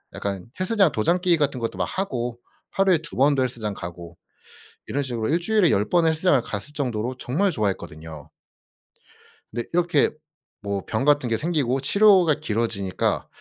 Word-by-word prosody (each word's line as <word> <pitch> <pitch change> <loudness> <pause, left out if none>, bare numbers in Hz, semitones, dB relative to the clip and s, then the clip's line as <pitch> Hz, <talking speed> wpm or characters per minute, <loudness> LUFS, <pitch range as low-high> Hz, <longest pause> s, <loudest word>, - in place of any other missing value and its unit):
약간 100 -1 -4
헬스장 190 -2 +3
도장 170 +12 +1
깨기 175 -2 +3
같은 140 -3 0
것도 115 -1 -4
막 - - 0
하고 125 -11 -3 0.3
하루에 195 -2 +3
2 160 +1 -9
번도 135 0 +3
헬스장 115 -5 -3
가고 85 -1 -9 0.7
이런 145 - -2
식으로 120 -4 -3
일주일에 175 +3 +2
10 105 +2 +1
번은 170 -2 +3
헬스장을 160 -3 +2
갔을 110 +9 -6
정도로 125 -3 -2
정말 180 +13 0
좋아했거든요. 80 - -4 1.2
네. 120 +1 -2
이렇게 170 -4 +3 0.5
뭐 100 -1 -3
병 110 +3 -2
같은 145 -3 +3
게 115 - +1
생기고 135 -4 0
치료가 190 -1 +5
길어지니까 110 - -1
130 Hz, 330 characters per minute, -23 LUFS, 110-170 Hz, 1.2 s, 치료가